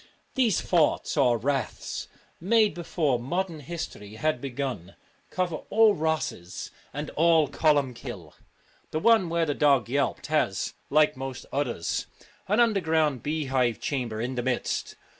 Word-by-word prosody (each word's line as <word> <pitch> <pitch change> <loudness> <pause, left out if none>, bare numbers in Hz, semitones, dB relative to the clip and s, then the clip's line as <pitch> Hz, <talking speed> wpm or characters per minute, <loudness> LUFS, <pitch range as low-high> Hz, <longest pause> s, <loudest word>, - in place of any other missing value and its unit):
These 240 - +2
forts 165 -4 +2
or 125 -5 +4
raths, 135 -1 -2 0.3
made 215 +4 +3
before 155 -6 0
modern 170 +6 -2
history 140 -9 -7
had 155 +1 0
begun, 130 -9 -4 0.3
cover 180 -3 -1
all 220 0 +5
Rosses 155 - -3 0.2
and 145 +2 -5
all 165 -1 +4
Columkille. 125 - 0 0.6
The 155 - -2
one 220 -2 +4
where 170 0 +1
the 145 - 0
dog 140 -5 +3
yelped 140 +2 0
has, 150 -10 0 0.2
like 150 +1 +4
most 130 -1 -6
others, 125 -11 -1 0.4
an 210 +4 +2
underground 160 - +2
beehive 135 -6 0
chamber 120 -6 -2
in 125 +3 -2
the 125 - -2
midst. 125 0 -2
145 Hz, 130 wpm, -27 LUFS, 125-165 Hz, 0.6 s, all